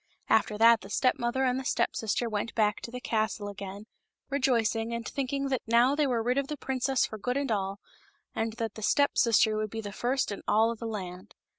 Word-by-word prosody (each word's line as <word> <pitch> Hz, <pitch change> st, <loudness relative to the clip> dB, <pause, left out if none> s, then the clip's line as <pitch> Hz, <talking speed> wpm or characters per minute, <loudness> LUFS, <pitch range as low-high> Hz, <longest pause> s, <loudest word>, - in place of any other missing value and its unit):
After 210 Hz, -, +3 dB
that 230 Hz, +1 st, +6 dB
the 195 Hz, -, -11 dB
step 255 Hz, +6 st, +1 dB
mother 240 Hz, +2 st, 0 dB
and 255 Hz, 0 st, +1 dB
the -, -, -5 dB
step -, -, 0 dB
sister 225 Hz, +2 st, -1 dB
went 215 Hz, +1 st, -3 dB
back 210 Hz, -2 st, +1 dB
to -, -, -6 dB
the 250 Hz, +1 st, -6 dB
castle 220 Hz, -3 st, -1 dB
again, 200 Hz, +1 st, -8 dB, 0.5 s
rejoicing 235 Hz, -4 st, +1 dB
and 235 Hz, -1 st, -5 dB
thinking 275 Hz, 0 st, -2 dB
that 260 Hz, -3 st, 0 dB
now 235 Hz, +4 st, +4 dB
they 295 Hz, 0 st, +2 dB
were 235 Hz, -3 st, 0 dB
rid 250 Hz, +3 st, +1 dB
of 275 Hz, -, -2 dB
the 300 Hz, -, -5 dB
princess 265 Hz, -1 st, 0 dB
for 215 Hz, -, -7 dB
good 250 Hz, +5 st, -1 dB
and 280 Hz, -3 st, -1 dB
all, 195 Hz, -1 st, -1 dB, 0.5 s
and 225 Hz, 0 st, -2 dB
that 230 Hz, -1 st, -4 dB
the 220 Hz, -, -9 dB
step 285 Hz, +6 st, +2 dB
sister 225 Hz, -2 st, +4 dB
would 215 Hz, 0 st, -2 dB
be 225 Hz, -, -5 dB
the 205 Hz, -2 st, -5 dB
first 245 Hz, +4 st, -1 dB
in 200 Hz, -, -5 dB
all 220 Hz, +2 st, +4 dB
of 230 Hz, -, -7 dB
the 230 Hz, -, -4 dB
land. 185 Hz, -4 st, -7 dB
230 Hz, 230 wpm, -29 LUFS, 215-255 Hz, 0.5 s, that